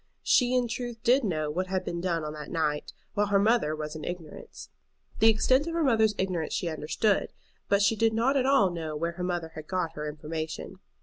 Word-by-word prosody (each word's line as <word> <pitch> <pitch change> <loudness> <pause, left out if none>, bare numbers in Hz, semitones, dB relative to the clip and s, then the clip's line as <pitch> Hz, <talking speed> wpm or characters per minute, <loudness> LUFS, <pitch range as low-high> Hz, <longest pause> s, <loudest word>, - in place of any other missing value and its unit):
She 250 0 +3
in 250 -1 +2
truth 240 0 -4
did 255 +3 +4
know 155 -7 -1
what 185 +4 -2
had 185 0 -2
been 170 0 -3
done 170 -3 -1
on 150 0 -4
that 150 -1 -8
night, 150 -3 -1 0.2
while 205 -1 +1
her 200 0 +3
mother 200 -7 +2
was 150 0 -5
in 155 - -7
ignorance. 175 -3 -8 0.5
The 225 - +7
extent 260 +7 +3
of 335 - -3
her 335 - +1
mother's 220 -5 +3
ignorance 180 -5 -1
she 175 - -1
understood, 160 +7 0 0.4
but 200 0 +4
she 215 +3 +3
did 225 +1 +2
not 235 +5 +1
at 265 -1 +2
all 215 -9 +4
know 160 -3 -4
where 170 +3 -1
her 180 +1 -6
mother 175 -2 -2
had 155 -1 -10
got 180 -3 -2
her 150 -1 -4
information. 155 +4 -6
185 Hz, 220 wpm, -28 LUFS, 155-225 Hz, 0.5 s, The